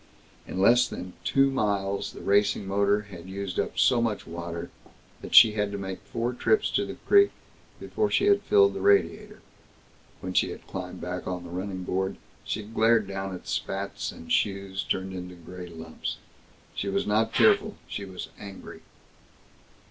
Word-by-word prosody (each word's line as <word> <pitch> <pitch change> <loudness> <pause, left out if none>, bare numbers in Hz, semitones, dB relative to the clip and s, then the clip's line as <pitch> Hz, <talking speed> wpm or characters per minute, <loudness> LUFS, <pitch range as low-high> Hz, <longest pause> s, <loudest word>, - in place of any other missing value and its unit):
In 95 - -4
less 120 +5 +5
than 90 0 -7
two 135 0 +3
miles 100 -5 -1
the - - -10
racing 100 0 +2
motor 100 +1 +2
had 95 -4 -11
used 95 -1 -4
up - - -2
so 120 -2 +4
much 110 -3 -1
water 85 0 -6 0.5
that - - -4
she 110 - +10
had 105 -1 -1
to 100 - -4
make 95 -1 -5
four 120 +2 -2
trips 430 - +2
to - - 0
the - - -6
creek 405 0 +6 0.5
before 430 0 -1
she 390 - +2
had 405 0 +4
filled 410 -1 +4
the - - -5
radiator. 215 - +2 0.8
When 95 - -5
she - - +3
had - - -9
climbed - - -7
back 90 0 -5
on 90 -1 -3
the 85 - -10
running 95 +1 -4
board 95 +1 -2 0.3
she 110 - -3
glared 110 +1 +3
down 95 -1 -4
at 90 - -11
spats 100 +1 -3
and 80 0 -11
shoes 100 -1 0
turned 95 0 -2
into 90 -1 -7
gray 90 +1 -9
lumps. 80 -1 -6 0.6
She 100 - -3
was 100 0 0
not 110 +2 +2
tearful. 210 0 +4
She 100 - -5
was 95 -2 -7
angry. 100 -2 -10
100 Hz, 170 wpm, -27 LUFS, 95-115 Hz, 0.8 s, she